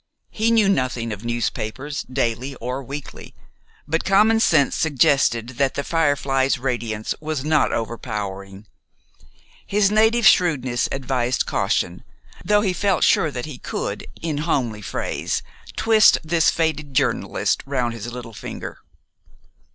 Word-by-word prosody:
He 220 +1 +1
knew 225 -3 +4
nothing 130 -10 0
of 105 +1 -9
newspapers, 120 +4 -3
daily 130 +1 -1
or 125 +3 -4
weekly; 140 +3 -9 0.5
but 165 +2 0
commonsense 195 -7 +4
suggested 140 -6 +2
that 135 -1 +1
"The 140 - -2
Firefly's" 140 -4 +1
radiance 120 -4 -2
was 155 -3 -3
not 155 0 +2
over 115 0 -3
powering. 100 -2 -6 1.0
His 200 0 +2
native 220 +2 +3
shrewdness 130 -11 +3
advised 130 -2 -1
caution, 90 +1 -1 0.4
though 210 0 +3
he 195 -3 0
felt 190 0 +1
sure 160 - +4
that 125 -4 -5
he 145 -5 -9
could, - - -4 0.2
in 155 -3 -2
homely 125 -9 -1
phrase, - - -3 0.3
twist 220 -1 +5
this 165 0 +3
faded 155 -4 -1
journalist 140 0 0
round 125 -4 -1
his 115 +1 -6
little 120 -2 -8
finger. - - -8
135 Hz, 130 wpm, -22 LUFS, 120-165 Hz, 1.0 s, twist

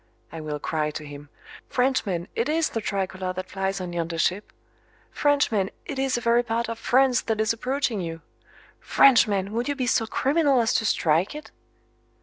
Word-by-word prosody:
I 165 - -7
will 150 -1 -4
cry 150 +1 -2
to 150 0 -7
him: 145 0 -10 0.4
"Frenchman, 225 -9 0
it 235 +5 -1
is 320 +1 +1
the 225 - -3
tricolor 190 -2 -3
that 185 0 -7
flies 195 0 -2
on 180 -1 -5
yonder 165 -1 -3
ship! 185 +5 0 0.6
Frenchman, 280 -10 +1 0.2
it 275 - -5
is 265 -2 +1
a - - -4
very 235 0 +3
part 235 0 -2
of 230 0 -5
France 255 +1 +3
that 220 -1 -2
is 220 +1 +2
approaching 250 -2 -2
you! 165 -1 -6 0.6
Frenchman, 205 -7 +4
would 235 +3 -1
you 285 - 0
be 260 -2 -2
so 225 -2 +1
criminal 280 +1 +2
as 230 -1 +2
to 220 - +1
strike 170 - +1
it?" 300 - -9
220 Hz, 180 wpm, -25 LUFS, 185-255 Hz, 0.6 s, Frenchman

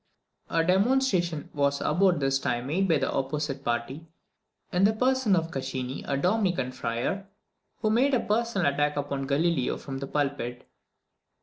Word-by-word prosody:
A 165 - +2
demonstration 185 - +1
was 140 -1 +1
about 175 +1 +2
this 135 -1 +1
time 120 -2 -1
made 180 +8 +1
by 165 -4 +3
the 135 - -1
opposite 140 0 -2
party, 120 +7 -3 0.7
in 180 +1 +2
the 210 +2 +5
person 255 -2 +2
of 165 -1 -1
Caccini, 130 -1 -4
a 140 - 0
Dominican 180 - +1
friar, 125 - -3 0.6
who 215 - +3
made 260 +5 +3
a - - +2
personal 210 -9 +1
attack 145 +1 0
upon 140 -1 -2
Galileo 145 -1 +1
from 135 -1 -6
the 135 - -5
pulpit. 135 -4 -2
150 Hz, 150 wpm, -27 LUFS, 135-195 Hz, 0.7 s, the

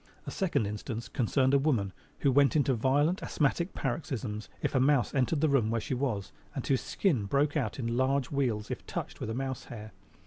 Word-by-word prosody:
A - - -5
second 185 - 0
instance 110 +3 -4
concerned 130 +1 +1
a 140 - +6
woman 120 -10 +1 0.3
who 140 - +4
went 140 +3 +4
into 140 -3 +3
violent 145 - +2
asthmatic 170 +5 0
paroxysms 120 -6 -3
if - - 0
a 130 - +3
mouse 135 -3 +3
entered 140 +3 +1
the 160 - +4
room 135 -7 +3
where 115 +1 +1
she 115 - -3
was, 120 -7 -2 0.2
and - - -3
whose 135 -2 +2
skin 140 - 0
broke 145 +8 +1
out 125 -9 -1
into 115 -3 -2
large 130 +1 +1
wheals 120 -7 -1
if - - -4
touched - - -5
with - - -3
mouse 130 -1 -3
hair. 110 -2 -9
130 Hz, 200 wpm, -30 LUFS, 115-140 Hz, 0.3 s, a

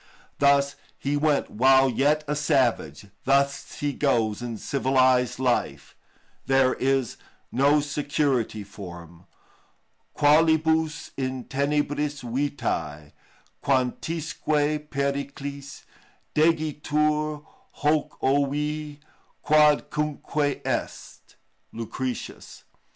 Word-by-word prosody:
Thus 140 0 +3 0.2
he 140 +1 -2
went 145 -1 +1
while 130 +3 +5
yet 145 +5 +1
a 150 - -1
savage, 130 - 0 0.2
thus 140 +1 +1
he 145 -1 0
goes 115 -7 0
in 120 -2 -5
civilised 130 0 +2
life; 125 -2 -1 0.5
there 135 -1 +4
is 135 -2 0 0.3
no 145 +3 +3
security 140 -6 -1
for 95 -4 -9
him. 85 +1 -18 0.9
"Qualibus 160 +1 +3
in 130 -1 -3
tenebris 145 +1 -1
vitæ, 85 - -3 0.5
quantisque 150 +2 -1
periclis 140 0 -4 0.5
Degitur 150 -1 +1 0.4
hocc' 150 0 +1
ævi, 145 +2 0 0.5
quodcunque 150 -1 +1
est!"—LUCR. 115 +3 -6
ii. 125 - 0
15. - - -9
140 Hz, 85 wpm, -25 LUFS, 130-150 Hz, 0.9 s, while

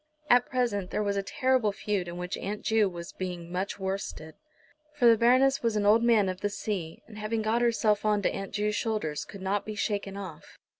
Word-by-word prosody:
At 245 0 +5
present 230 -8 0
there 210 - -1
was 200 -1 0
a 200 - +1
terrible 255 +1 +1
feud 200 -3 -2
in 170 0 -6
which 180 +2 -3
Aunt 205 +2 -4
Ju 220 -3 +3
was 170 -1 -8
being 175 -2 -6
much 185 +2 -2
worsted. 190 -5 -4 0.6
For 270 -5 +1
the 230 -1 +8
Baroness 255 +4 +4
was 230 -2 0
an 210 -1 +1
old 215 +3 +6
Man 225 -4 +4
of 185 0 -4
the 205 - 0
Sea, 195 -6 -4
and 215 -2 -11
having 215 +1 -2
got 225 +2 +1
herself 225 -3 +2
on 210 -1 +2
to - - +2
Aunt 195 -1 -5
Ju's 210 +1 0
shoulders 210 -11 -2
could 195 -2 -10
not 195 +1 0
be 215 - -6
shaken 205 -3 -2
off. 185 -6 -9
205 Hz, 215 wpm, -28 LUFS, 190-225 Hz, 0.6 s, the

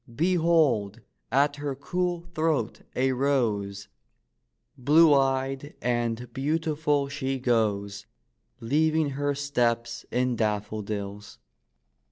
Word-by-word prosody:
Behold, 160 - +2 0.3
at 145 +3 +2
her 145 -2 -3
cool 175 +5 -2
throat 155 -8 0
a 130 +1 +2
rose, 115 -7 0 0.9
Blue 150 +4 +5
eyed 135 +1 0
and 120 0 -2
beautiful 150 0 0
she 135 -1 -3
goes, 105 -5 0 0.5
Leaving 155 +4 +1
her 145 +1 -1
steps 120 -4 -1
in 125 0 0
daffodils. 105 -1 -3
135 Hz, 90 wpm, -26 LUFS, 115-145 Hz, 0.9 s, Blue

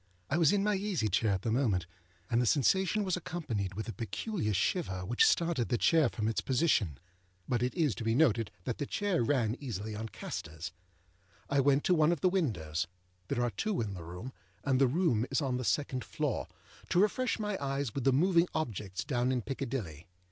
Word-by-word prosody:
I 155 - +2
was 165 -4 +5
in 200 -1 +2
my 210 0 +2
easy 195 - 0
chair 110 - +2
at 95 0 -2
the 115 - 0
moment, 110 -8 +1 0.4
and 120 +1 +2
the 125 - +1
sensation 190 - +3
was 185 -3 0
accompanied 125 - -3
with 110 +3 -4
a 115 - -4
peculiar 115 - -3
shiver 95 - 0
which 120 +5 +4
started 165 -8 +1
the 120 - +2
chair 160 +1 +4
from 110 -2 -2
its 110 - 0
position. 125 - +1 0.5
(But 120 -2 0
it 125 +1 -1
is 155 -8 +2
to 95 - -6
be 115 0 +1
noted 120 -7 +3
that 120 - -3
the 145 - -2
chair 200 -6 0
ran 115 -3 +1
easily 110 -5 -5
on 110 +1 -5
castors.) 80 -4 -6 0.8
I 140 - +3
went 140 +1 +3
to 180 - +3
one 155 -1 +4
of 170 - -1
the 185 - +4
windows 95 - -1 0.4
(there 120 - 0
are 120 - 0
two 200 - -1
in 105 -4 -2
the 90 - -7
room, 90 +10 -8 0.3
and 135 -1 +2
the 135 - +6
room 130 - +1
is - - +1
on 130 -4 0
the 125 - -3
second 130 -1 0
floor) - - -2 0.4
to 175 - +3
refresh 220 +5 +2
my 210 -2 -2
eyes 135 -3 -2
with 135 - -3
the 135 - +4
moving 170 +5 +4
objects 105 - -3
down 125 -3 0
in 125 -3 -1
Piccadilly. 115 - -4
130 Hz, 205 wpm, -31 LUFS, 110-165 Hz, 0.8 s, the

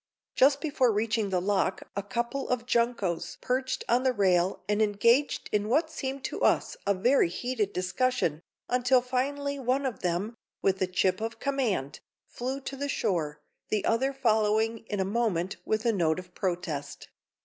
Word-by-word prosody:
Just 275 +2 +4
before 280 -6 +2
reaching 215 0 0
the 185 -1 +1
lock 190 0 0
a 200 - -1
couple 235 +6 -3
of 250 -2 -1
juncos 235 -8 0
perched 260 +1 -1
on 240 +2 +3
the 260 -1 +2
rail 185 -3 +2
and 210 +1 +1
engaged 230 +7 +2
in 210 0 0
what 315 +6 +2
seemed 270 -3 -4
to - - -4
us - - +2
a 200 - +3
very 240 +1 +3
heated 220 +2 -2
discussion, 185 - 0 0.3
until 250 +1 +3
finally 280 +3 -1
one 265 +2 0
of 245 -7 -3
them, 180 +6 -1 0.3
with 190 0 +1
a 185 - +2
chip 185 +1 +1
of 225 0 -4
command, 245 - -1 0.3
flew 260 +3 -4
to 275 - -6
the 285 +1 -3
shore, 150 - -1 0.3
the 210 -2 0
other 260 +4 +2
following 220 -3 +2
in 205 - -3
a 190 - +1
moment 195 -4 0
with 215 +2 -1
a 230 - +3
note 165 -5 +1
of 180 -1 -9
protest. 170 -6 -4
225 Hz, 170 wpm, -28 LUFS, 190-255 Hz, 0.3 s, Just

